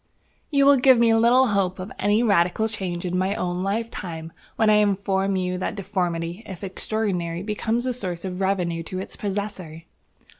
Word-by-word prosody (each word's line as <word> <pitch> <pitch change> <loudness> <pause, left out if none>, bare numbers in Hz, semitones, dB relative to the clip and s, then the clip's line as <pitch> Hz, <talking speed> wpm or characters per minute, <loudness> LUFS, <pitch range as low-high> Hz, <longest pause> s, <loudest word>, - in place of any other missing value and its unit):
"You 280 -2 +3
will 280 0 +7
give 260 0 +6
me 230 -1 +4
little 240 +3 +5
hope 195 -3 0
of 185 +2 -7
any 205 +3 +2
radical 200 0 +2
change 185 -5 -4
in 180 0 -2
my 190 +2 0
own 180 0 -2
lifetime 190 -6 -4 0.2
when 220 - +2
I 210 0 +6
inform 195 -1 +1
you 180 -1 -1
that - - -3
deformity, 180 -2 -2
if 190 0 -8
extraordinary, 185 -3 -2
becomes 220 +3 -1
a 255 - 0
source 185 -7 -4
of 185 0 -4
revenue 180 -3 0
to 185 +3 -6
its 190 - -6
possessor." 195 -5 -5
195 Hz, 175 wpm, -24 LUFS, 180-220 Hz, 0.2 s, will